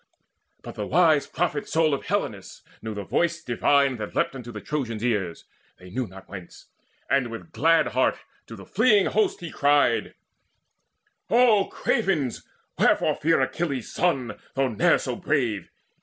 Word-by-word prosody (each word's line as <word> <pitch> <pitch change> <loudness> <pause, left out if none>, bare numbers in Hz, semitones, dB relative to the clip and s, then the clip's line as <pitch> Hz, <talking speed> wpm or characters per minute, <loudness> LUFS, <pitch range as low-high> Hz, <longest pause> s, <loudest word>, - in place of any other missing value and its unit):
But - - -8
the 105 - -5
wise 160 -2 +3
prophet 160 -4 -2
soul 160 -1 +2
Of 140 - -3
Helenus 110 - -3 0.2
knew 110 -1 -5
the 100 - -4
voice 170 - -1
divine 135 +1 +2
that 105 -2 -7
leapt - - +1
Unto 120 -2 -8
the 110 - -7
Trojans' 120 -5 -4
ears, 100 -8 -2 0.3
they 90 0 -14
knew 125 +3 -2
not 95 0 -13
whence, 95 -4 -11 0.4
And 135 -3 +1
with 115 +8 -9
glad 165 +1 +3
heart - - +1 0.3
to - - -9
the - - -12
fleeing 210 -6 +3
host 215 -3 0
he 170 -3 -6
cried: 145 0 +2 1.1
"O 230 -5 +4
cravens, 145 -10 -1 0.4
wherefore - - +3
fear 165 +2 +1
Achilles' 140 -8 -2
son, 130 -11 0 0.2
Though 135 -1 +1
ne'er 125 +10 +3
so 125 -3 -4
brave? 120 - -1
140 Hz, 155 wpm, -25 LUFS, 110-165 Hz, 1.1 s, O